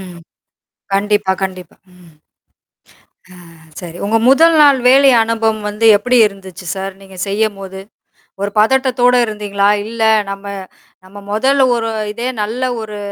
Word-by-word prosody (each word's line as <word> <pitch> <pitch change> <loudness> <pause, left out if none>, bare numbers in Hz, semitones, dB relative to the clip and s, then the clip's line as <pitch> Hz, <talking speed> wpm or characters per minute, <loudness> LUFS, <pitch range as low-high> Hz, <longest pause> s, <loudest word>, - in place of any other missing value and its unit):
ம். 180 -2 -11 0.8
கண்டிப்பா, 205 -1 0
கண்டிப்பா 185 -3 -7 0.2
ம். 175 -3 -19 1.2
அ - - -15 0.5
சரி 175 -1 -9
உங்க 225 +2 +1
முதல் 325 +5 +5
நாள் 285 -3 +5
வேலை 270 +2 +6
அனுபவம் 225 -1 -1
வந்து 210 +2 -2
எப்பிடி 250 +4 0
இருந்துச்சு 190 -2 -12
சார்? 195 0 -5
நீங்கச் 190 -1 -7
செய்யும்போது. 195 -2 -3 0.6
ஒரு 200 - -2
பதட்டத்தோட 250 +2 +2
இருந்தீங்களா? 205 -2 -1 0.2
இல்ல 230 +1 -5 0.3
நம்ம 195 +1 -7 0.6
நம்ம 200 +2 -13
முதல் 265 +6 +2
ஒரு 225 -1 -3 0.2
இதே 235 +4 -4
நல்ல 225 +5 -4 0.2
ஒரு 210 -1 -8
210 Hz, 130 wpm, -15 LUFS, 195-235 Hz, 1.2 s, வேலை